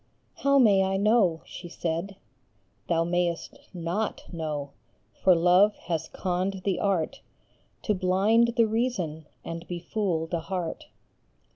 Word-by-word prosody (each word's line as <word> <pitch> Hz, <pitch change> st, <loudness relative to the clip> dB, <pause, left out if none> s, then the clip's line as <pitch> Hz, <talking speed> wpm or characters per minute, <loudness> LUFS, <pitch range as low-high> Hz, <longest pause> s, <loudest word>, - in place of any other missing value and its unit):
" -, -, -42 dB
How 280 Hz, 0 st, +5 dB
may 210 Hz, -7 st, +6 dB
I 190 Hz, 0 st, 0 dB
know? 200 Hz, -5 st, +3 dB
" -, -, -31 dB
she 175 Hz, -, -9 dB
said. 170 Hz, +4 st, -3 dB, 0.7 s
Thou 165 Hz, -1 st, +2 dB
mayest 175 Hz, 0 st, -1 dB
not 180 Hz, +5 st, -3 dB
know, 150 Hz, -4 st, -4 dB, 0.5 s
for 185 Hz, -2 st, +6 dB
Love 180 Hz, +5 st, +5 dB
has 165 Hz, -2 st, -3 dB
conned 185 Hz, +1 st, -2 dB
the 195 Hz, -3 st, 0 dB
art 190 Hz, -6 st, 0 dB, 0.6 s
To 210 Hz, -, +1 dB
blind 205 Hz, +5 st, +3 dB
the 230 Hz, -, +6 dB
reason 205 Hz, -10 st, -2 dB, 0.2 s
and 165 Hz, 0 st, -6 dB
befool 175 Hz, -1 st, -2 dB
the 170 Hz, +1 st, -2 dB
heart. 175 Hz, 0 st, -4 dB
180 Hz, 135 wpm, -27 LUFS, 165-205 Hz, 0.7 s, may